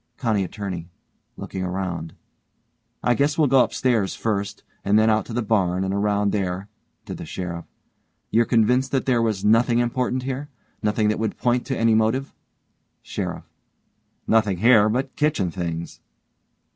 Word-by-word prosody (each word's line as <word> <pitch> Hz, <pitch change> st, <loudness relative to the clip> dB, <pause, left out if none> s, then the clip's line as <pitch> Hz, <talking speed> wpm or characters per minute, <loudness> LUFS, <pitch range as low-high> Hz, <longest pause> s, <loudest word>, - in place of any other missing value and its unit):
COUNTY 110 Hz, -6 st, +1 dB
ATTORNEY: 90 Hz, -3 st, -5 dB, 0.5 s
(looking 95 Hz, -, -5 dB
around) 90 Hz, -3 st, -4 dB, 0.9 s
I 120 Hz, -, +3 dB
guess 145 Hz, +5 st, +1 dB
we'll 155 Hz, -, +4 dB
go 135 Hz, -2 st, +5 dB
upstairs 115 Hz, -7 st, 0 dB
first 100 Hz, -2 st, -2 dB, 0.2 s
and 100 Hz, +2 st, +3 dB
then 110 Hz, +1 st, +4 dB
out 110 Hz, 0 st, +1 dB
to 115 Hz, -, -7 dB
the 120 Hz, 0 st, -1 dB
barn 95 Hz, -4 st, +1 dB
and 95 Hz, 0 st, -1 dB
around 100 Hz, 0 st, +1 dB
there, 95 Hz, 0 st, -2 dB, 0.4 s
(to -, -, -6 dB
the -, -, -7 dB
SHERIFF) 85 Hz, -2 st, -5 dB, 0.7 s
You're 115 Hz, +1 st, +4 dB
convinced 125 Hz, +3 st, +2 dB
that 135 Hz, -, +1 dB
there 125 Hz, -3 st, +2 dB
was 105 Hz, -3 st, -1 dB
nothing 115 Hz, +2 st, +4 dB
important 125 Hz, +1 st, 0 dB
here 135 Hz, +2 st, -4 dB, 0.3 s
nothing 105 Hz, 0 st, +1 dB
that 105 Hz, -, -1 dB
would 110 Hz, -2 st, -2 dB
point 120 Hz, 0 st, 0 dB
to 135 Hz, -, -2 dB
any 115 Hz, 0 st, +3 dB
motive. 110 Hz, +5 st, +1 dB, 0.7 s
SHERIFF: -, -, -4 dB, 0.8 s
Nothing 105 Hz, -4 st, +2 dB
here 110 Hz, +1 st, +5 dB
but 130 Hz, +4 st, -2 dB
kitchen 130 Hz, -, +1 dB
things. 85 Hz, -1 st, -5 dB
110 Hz, 155 wpm, -23 LUFS, 95-120 Hz, 0.9 s, go